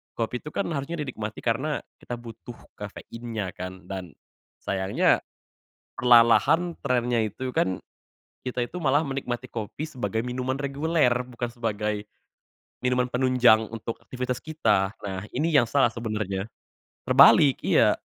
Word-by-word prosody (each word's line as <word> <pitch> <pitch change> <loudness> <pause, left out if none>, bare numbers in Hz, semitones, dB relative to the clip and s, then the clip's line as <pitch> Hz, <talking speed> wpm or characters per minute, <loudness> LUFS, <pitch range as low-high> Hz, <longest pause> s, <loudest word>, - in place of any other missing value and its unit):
kopi 120 +1 -2
itu - - -10
kan 200 - 0
harusnya 145 +3 -3
dinikmati 110 -6 -5
karena 130 +6 0 0.2
kita 120 - -5
butuh 115 0 -10 0.2
kafeinnya 110 -1 -6
kan 95 0 -7
dan 95 -5 -6 0.5
sayangnya, 95 0 +2 0.8
perlahan-lahan, 125 +8 +5
trennya 125 -3 +1
itu 125 +5 -5
kan 95 -1 +1 0.7
kita 125 -1 -1
itu 180 - -8
malah 145 +1 +3
menikmati 130 -3 -3
kopi 115 +7 -5
sebagai 120 -4 -2
minuman 125 +1 -2
reguler 145 +1 +1 0.2
bukan 120 -1 -4
sebagai 105 -3 -2 0.8
minuman 125 0 +2
penunjang 125 -3 +4
untuk 115 0 -4
aktivitas 125 -1 -3
kita. 105 -12 +1
Nah 95 -1 -4
ini 155 +6 +1
yang 125 -5 +6
salah 135 -5 +4
sebenarnya, 105 -4 -3 0.6
terbalik, 140 -3 +7
iya. - - +4
120 Hz, 125 wpm, -26 LUFS, 110-130 Hz, 0.8 s, terbalik